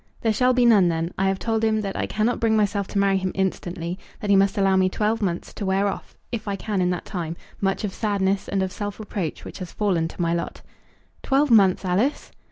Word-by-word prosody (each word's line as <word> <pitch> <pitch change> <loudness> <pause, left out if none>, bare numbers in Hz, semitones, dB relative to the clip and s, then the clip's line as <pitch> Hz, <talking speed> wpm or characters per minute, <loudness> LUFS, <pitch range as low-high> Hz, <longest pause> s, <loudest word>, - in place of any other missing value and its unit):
"There 225 -1 +2
shall 250 +4 +3
be 250 -1 +3
none, 210 -6 +6
then. 165 0 -1
I 195 - +1
have 195 0 +1
told 225 +2 -1
him 220 -1 +2
that 195 -2 -4
I - - -1
cannot 220 +3 0
bring 225 -1 +2
myself 205 -2 +1
to - - -4
marry 195 -1 +3
him 185 0 -2
instantly; 180 -2 -2 0.2
that 205 - -1
he - - +6
must 195 0 +3
allow 195 -1 +3
me 185 0 +3
twelve 215 +3 0
months 175 -4 -2
to - - -6
wear 190 +1 +1
off, 195 - -5 0.2
if 225 -3 -4
I 200 - -1
can 200 0 -2
in 180 - +2
that 180 -1 -2
time, 170 -2 -4 0.2
much 195 +1 0
of 200 -3 -2
sadness 200 -2 0
and 195 -1 0
of 190 - -3
self 205 +2 -5
reproach 200 -6 -4
which - - -8
has 180 -2 -6
fallen 185 -6 +1
to 165 - -12
my 170 -1 +1
lot." 170 - -4 0.6
"Twelve 275 0 +2
months, 195 -4 +5
Alice?" 205 +11 0
195 Hz, 240 wpm, -24 LUFS, 185-215 Hz, 0.6 s, none